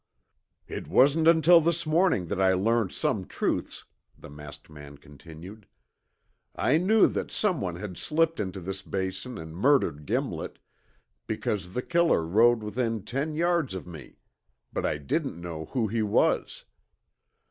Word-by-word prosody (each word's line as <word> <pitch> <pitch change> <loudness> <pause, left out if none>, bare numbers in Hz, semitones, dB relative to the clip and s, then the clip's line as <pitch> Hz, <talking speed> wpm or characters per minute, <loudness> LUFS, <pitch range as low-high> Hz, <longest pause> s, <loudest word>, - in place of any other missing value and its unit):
"It - - -6
wasn't 145 +5 +4
until 165 +1 +6
this 170 +1 0
morning 155 - +2
that 100 -1 -1
I 95 0 +4
learned 110 +2 +1
some - - -1
truths," - - -3 0.3
the - - -13
masked 75 0 -11
man 75 -2 -12
continued. 80 +8 -13 0.9
"I 145 - +2
knew 205 +6 +4
that - - -2
someone 140 - -1
had 95 0 -7
slipped 165 +1 0
into 95 -2 -4
this 95 +2 -5
Basin 95 +6 -4
and 80 0 -9
murdered 90 - +1
Gimlet, - - -3 0.7
because 90 -4 -3
the 125 - -1
killer 170 - +2
rode 110 +6 +3
within 115 -1 -2
ten 140 +7 -3
yards 170 - 0
of 95 - -6
me, 80 -6 -12 0.6
but - - -1
I - - -1
didn't 75 +3 -3
know 85 -2 -6
who 120 +4 -1
he 110 +2 -1
was. 105 -1 0
105 Hz, 145 wpm, -27 LUFS, -, 0.9 s, until